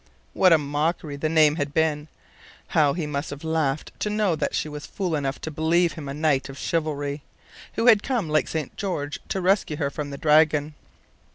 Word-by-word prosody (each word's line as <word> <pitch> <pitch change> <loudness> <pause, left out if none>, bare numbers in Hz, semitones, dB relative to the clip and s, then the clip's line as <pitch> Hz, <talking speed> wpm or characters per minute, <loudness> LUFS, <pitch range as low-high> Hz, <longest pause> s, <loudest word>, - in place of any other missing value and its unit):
What 185 -1 +4
a 165 - +8
mockery 150 +1 -2
the 155 +2 -2
name 155 -1 +4
had 145 -1 -3
been! 155 -2 +1 0.6
How 145 -3 +3
he 170 -1 -3
must 150 0 -3
have 145 +1 -8
laughed 155 -3 -1
to 210 - -1
know 210 -4 +1
that - - -2
she - - -1
was 150 -1 -7
fool 185 -4 -3
enough 140 -2 -2
to 160 - -5
believe 165 +3 +2
him 145 -4 -7
a - - -4
knight 150 -3 +1
of 135 - -9
chivalry, 145 -3 -2 0.5
who 225 - -1
had 225 -4 +7
come 240 -9 -1
like 155 -2 +1
St. 155 -4 -4
George 150 -8 -3
to 195 - -1
rescue 185 -4 +2
her 140 -3 -1
from 145 0 -5
the 140 - -6
dragon! 150 0 +3
155 Hz, 200 wpm, -24 LUFS, 145-165 Hz, 0.6 s, a